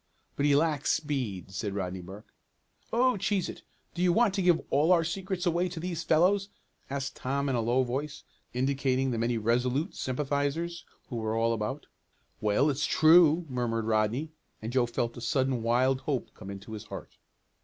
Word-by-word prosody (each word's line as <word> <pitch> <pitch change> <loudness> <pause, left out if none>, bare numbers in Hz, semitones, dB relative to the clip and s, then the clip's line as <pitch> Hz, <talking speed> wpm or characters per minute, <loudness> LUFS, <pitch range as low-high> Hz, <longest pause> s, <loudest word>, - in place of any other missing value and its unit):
"But 145 - +1
he 145 - +4
lacks 150 -1 +2
speed," 125 - -3
said 100 +1 -3
Rodney 95 -2 -3
Burke. 95 +4 -12 0.6
"Oh, 250 0 +3
cheese 195 -1 0
it! - - -8 0.3
Do 175 - -4
you 180 -1 +4
want 220 +2 +3
to 195 - 0
give 175 -2 +4
all 150 +5 +3
our 170 -2 +5
secrets 185 +2 -3
away 175 +1 +1
to 170 -1 -6
these 170 -1 -3
fellows?" 190 +6 +3 0.4
asked 140 0 -3
Tom 140 +2 -1
in 135 - 0
a 120 - +1
low 120 +3 +2
voice, 140 +4 -4 0.3
indicating 130 0 0
the 115 - -2
many 115 +1 0
Resolute 125 - 0
sympathizers 145 +5 -2 0.2
who 120 - -4
were 110 -1 -1
all 115 +1 +2
about. 115 +6 -3 0.5
"Well, 105 +7 +2
it's 140 +2 -1
true," 160 +1 +6
murmured 120 -4 -1
Rodney, 110 +8 0 0.3
and 110 +2 -6
Joe 125 -2 +3
felt 120 0 -2
a - - -7
sudden 130 -1 0
wild 130 +3 +2
hope 140 -5 -3
come 95 - -10
into 100 +2 -8
his 105 - -7
heart. - - -9
135 Hz, 180 wpm, -29 LUFS, 115-165 Hz, 0.6 s, true